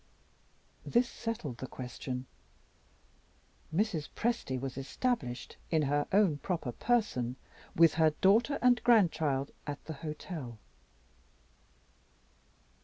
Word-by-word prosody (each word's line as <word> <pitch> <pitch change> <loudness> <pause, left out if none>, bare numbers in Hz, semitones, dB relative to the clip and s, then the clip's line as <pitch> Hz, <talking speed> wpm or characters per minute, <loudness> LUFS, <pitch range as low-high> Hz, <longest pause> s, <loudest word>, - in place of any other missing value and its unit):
This 240 +1 +2
settled 185 - -5
the 130 - -5
question. 125 0 -5 1.5
Mrs. 170 -3 0
Presty 225 - -1
was 135 0 -4
established, 135 - -2
in 160 -2 +2
her 145 +1 +1
own 190 -7 +4
proper 165 -8 -2
person, 130 - 0 0.4
with 165 -2 +6
her 160 -1 +5
daughter 210 - +3
and 245 -2 +5
grandchild 160 - +3 0.2
at 145 0 -5
the 160 - -5
hotel. 150 -6 -6
155 Hz, 100 wpm, -32 LUFS, 135-215 Hz, 1.5 s, with